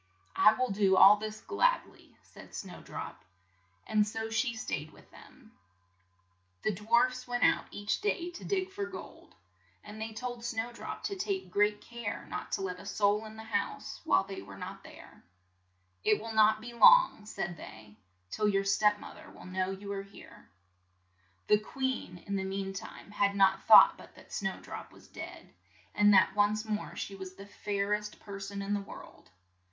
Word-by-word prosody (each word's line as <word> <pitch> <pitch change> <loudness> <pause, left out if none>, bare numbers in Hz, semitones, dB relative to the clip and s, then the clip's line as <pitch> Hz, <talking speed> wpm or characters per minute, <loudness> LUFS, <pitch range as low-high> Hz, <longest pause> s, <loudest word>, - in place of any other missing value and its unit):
"I 215 - +7
will 255 +1 -1
do 195 -1 +3
all 200 +2 +9
this 215 0 -6
glad - - +2
ly," - - -19 0.2
said - - -14
Snow 190 -2 -7
drop, - - -8 0.6
and 210 -1 +2
so 225 +1 -4
she 230 +2 0
stayed 155 -8 -4
with - - -19
them. - - -17 1.1
The 215 - +1
dwarfs 240 +6 +1
went 245 0 -1
out - - +4
each 205 +1 -2
day 355 -4 -1
to 350 - -10
dig 380 -1 -1
for 400 0 -4
gold, 370 - -11 0.5
and 210 +1 -9
they 220 0 -4
told 240 +1 -6
Snow 235 0 -3
drop - - -7
to 395 - -2
take 380 0 -3
great 210 0 +2
care 235 -3 -6
not - - -5
to - - 0
let 180 -1 -4
a - - -11
soul 210 +1 +1
in 215 0 -10
the 220 - -9
house 205 -2 -3
while 320 -11 +3
they 195 0 -7
were 100 0 -11
not - - -7
there, - - -14 0.8
"It 210 - +3
will 225 +1 -6
not 215 0 +4
be 240 +1 -8
long," 365 - +6
said 175 -4 -4
they, 110 -8 -12 0.4
"till 210 - 0
your 195 -1 +2
step 210 +1 +3
moth - - -11
er - - -13
will - - -14
know 185 0 -2
you 195 +1 -6
are 195 - -3
here." 195 0 -15 1.0
The 210 - +4
queen 260 -5 -3
in 200 -1 -2
the 190 - -2
mean 195 0 -3
time 195 +1 -9
had 200 -1 +1
no 195 -1 +5
thought 220 - +9
but - - -15
that - - -15
Snow 195 -1 -2
drop - - -8
was - - -17
dead, - - -10 0.4
and 205 +1 +5
that - - +5
once 210 +1 +2
more 215 -1 -3
she - - -5
was 190 -1 -8
the 195 - -11
fair 200 0 -2
est 210 0 -3
per 200 -2 -8
son 200 0 -5
in 200 +1 -2
the 205 - 0
world. 195 - -12
210 Hz, 190 wpm, -31 LUFS, 195-230 Hz, 1.1 s, all